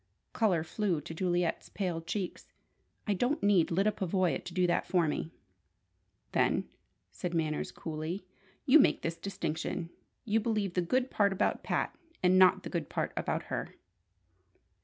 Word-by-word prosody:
Colour 185 Hz, -8 st, +2 dB
flew 180 Hz, 0 st, -1 dB
to 150 Hz, -, -8 dB
Juliet's 175 Hz, 0 st, 0 dB
pale 180 Hz, -5 st, -2 dB
cheeks. 180 Hz, +2 st, -4 dB, 0.6 s
"I 210 Hz, -, +1 dB
don't 245 Hz, -, 0 dB
need 200 Hz, -5 st, +4 dB
Lyda 195 Hz, +5 st, +2 dB
Pavoya 185 Hz, -2 st, 0 dB
to -, -, -6 dB
do 180 Hz, -1 st, +3 dB
that 175 Hz, 0 st, +1 dB
for 175 Hz, -4 st, +2 dB
me!" 155 Hz, -, -2 dB, 1.0 s
"Then," -, -, +2 dB, 0.4 s
said 175 Hz, -1 st, -4 dB
Manners, 155 Hz, -2 st, -1 dB
coolly, 160 Hz, +4 st, -5 dB, 0.4 s
"you 290 Hz, +4 st, +8 dB
make -, -, +3 dB
this 165 Hz, 0 st, -1 dB
distinction. 165 Hz, -2 st, -3 dB, 0.3 s
You 220 Hz, +1 st, +2 dB
believe 210 Hz, -4 st, -1 dB
the 180 Hz, -, +2 dB
good 255 Hz, +9 st, 0 dB
part 200 Hz, -2 st, +3 dB
about 190 Hz, -, 0 dB
Pat, -, -, -1 dB, 0.3 s
and 185 Hz, +1 st, +5 dB
not 185 Hz, 0 st, +6 dB
the -, -, -5 dB
good 165 Hz, -5 st, -2 dB
part -, -, -1 dB
about -, -, -1 dB
her." -, -, -3 dB
180 Hz, 155 wpm, -31 LUFS, 165-200 Hz, 1.0 s, you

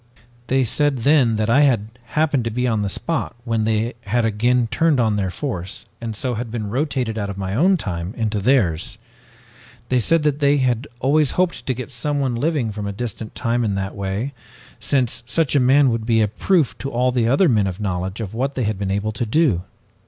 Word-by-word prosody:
"They 135 Hz, 0 st, +2 dB
said 135 Hz, +4 st, +1 dB
then 135 Hz, -6 st, +4 dB
that 110 Hz, 0 st, 0 dB
I 125 Hz, +5 st, +4 dB
had 120 Hz, -7 st, +2 dB, 0.3 s
happened 145 Hz, -5 st, +2 dB
to -, -, 0 dB
be 125 Hz, +3 st, -1 dB
on 110 Hz, -3 st, +1 dB
the 100 Hz, -, -1 dB
spot 145 Hz, +2 st, -3 dB
when 115 Hz, -2 st, 0 dB
they 110 Hz, +2 st, 0 dB
had 120 Hz, +3 st, +1 dB
again 120 Hz, +3 st, +2 dB
turned 160 Hz, -4 st, +2 dB
on 110 Hz, -3 st, +2 dB
their 100 Hz, -2 st, -1 dB
force 95 Hz, -, -5 dB, 0.2 s
and 115 Hz, -2 st, -4 dB
so 125 Hz, +3 st, -2 dB
had 115 Hz, +1 st, -4 dB
been 110 Hz, -3 st, -4 dB
rotated 125 Hz, -4 st, -1 dB
out 100 Hz, -1 st, -3 dB
of 100 Hz, -, -6 dB
my 95 Hz, -1 st, -3 dB
own 180 Hz, -, +4 dB
time 90 Hz, -, -4 dB
into 110 Hz, -2 st, -1 dB
theirs. 95 Hz, -8 st, +1 dB, 0.9 s
They 125 Hz, -, +3 dB
said 165 Hz, +7 st, +2 dB
that 150 Hz, -1 st, +1 dB
they 145 Hz, 0 st, +3 dB
had 125 Hz, 0 st, 0 dB
always 145 Hz, +2 st, +3 dB
hoped 180 Hz, -1 st, 0 dB
to 130 Hz, -, 0 dB
get 130 Hz, +3 st, -7 dB
someone 135 Hz, +1 st, -1 dB
living 130 Hz, -2 st, 0 dB
from 105 Hz, 0 st, -5 dB
a -, -, -2 dB
distant 110 Hz, +1 st, -6 dB
time 120 Hz, 0 st, 0 dB
in 105 Hz, -3 st, 0 dB
that 95 Hz, 0 st, -3 dB
way, 100 Hz, +7 st, -3 dB, 0.5 s
since 130 Hz, -5 st, 0 dB
such 150 Hz, +3 st, +1 dB
a -, -, +5 dB
man 135 Hz, +1 st, +5 dB
would 115 Hz, -1 st, -3 dB
be 115 Hz, -2 st, +3 dB
a 105 Hz, -, +3 dB
proof 150 Hz, -, +1 dB
to 135 Hz, -, -4 dB
all 125 Hz, 0 st, +1 dB
the 120 Hz, -2 st, +1 dB
other 140 Hz, +10 st, +4 dB
men 105 Hz, -7 st, +3 dB
of 95 Hz, +1 st, -5 dB
knowledge 95 Hz, +1 st, -3 dB
of 105 Hz, -2 st, -5 dB
what 135 Hz, +4 st, -2 dB
they 130 Hz, -, -1 dB
had 105 Hz, -2 st, -1 dB
been 100 Hz, -1 st, -2 dB
able 100 Hz, +2 st, -1 dB
to 110 Hz, +3 st, -3 dB
do. 125 Hz, -, +2 dB
120 Hz, 220 wpm, -21 LUFS, 105-135 Hz, 0.9 s, a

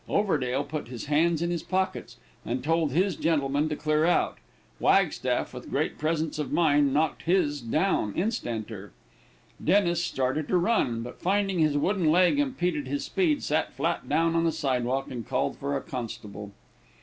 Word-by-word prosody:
Overdale 145 Hz, -10 st, +1 dB
put 145 Hz, -2 st, -5 dB
his 120 Hz, -1 st, -7 dB
hands 160 Hz, +3 st, +2 dB
on 170 Hz, -, -1 dB
his 170 Hz, -2 st, -2 dB
pockets, 190 Hz, 0 st, -2 dB, 0.3 s
and 125 Hz, +2 st, -3 dB
told 160 Hz, 0 st, +1 dB
his 180 Hz, +4 st, +1 dB
gentleman 145 Hz, -2 st, +1 dB
to 150 Hz, -, -2 dB
clear 155 Hz, +1 st, +1 dB
out. 175 Hz, +2 st, +1 dB, 0.4 s
Wagstaff, -, -, +2 dB
with -, -, -9 dB
great -, -, -1 dB
presence 155 Hz, 0 st, -1 dB
of 150 Hz, -, -3 dB
mind, 145 Hz, -4 st, +3 dB
knocked 150 Hz, +2 st, +1 dB
his 165 Hz, -5 st, +1 dB
down 120 Hz, -, 0 dB
instanter. 110 Hz, -, -3 dB, 0.7 s
Dennis 175 Hz, -1 st, +3 dB
started 135 Hz, +1 st, -1 dB
to 185 Hz, -, +2 dB
run, 170 Hz, -, +1 dB
but 125 Hz, -, -9 dB
finding 195 Hz, -1 st, +1 dB
his 155 Hz, -2 st, +3 dB
wooden 180 Hz, +1 st, +1 dB
leg 180 Hz, -, +4 dB
impeded 180 Hz, -, -1 dB
his 140 Hz, +2 st, -2 dB
speed, 310 Hz, -6 st, +1 dB
sat 155 Hz, +2 st, 0 dB
flat 165 Hz, +7 st, -2 dB
down 165 Hz, 0 st, +2 dB
on 165 Hz, -, +2 dB
the 165 Hz, -, +2 dB
sidewalk 135 Hz, -3 st, -1 dB
and 120 Hz, -2 st, -6 dB
called 130 Hz, +1 st, -1 dB
for 140 Hz, 0 st, -1 dB
a -, -, -4 dB
constable. 105 Hz, -5 st, -7 dB
155 Hz, 165 wpm, -27 LUFS, 135-175 Hz, 0.7 s, leg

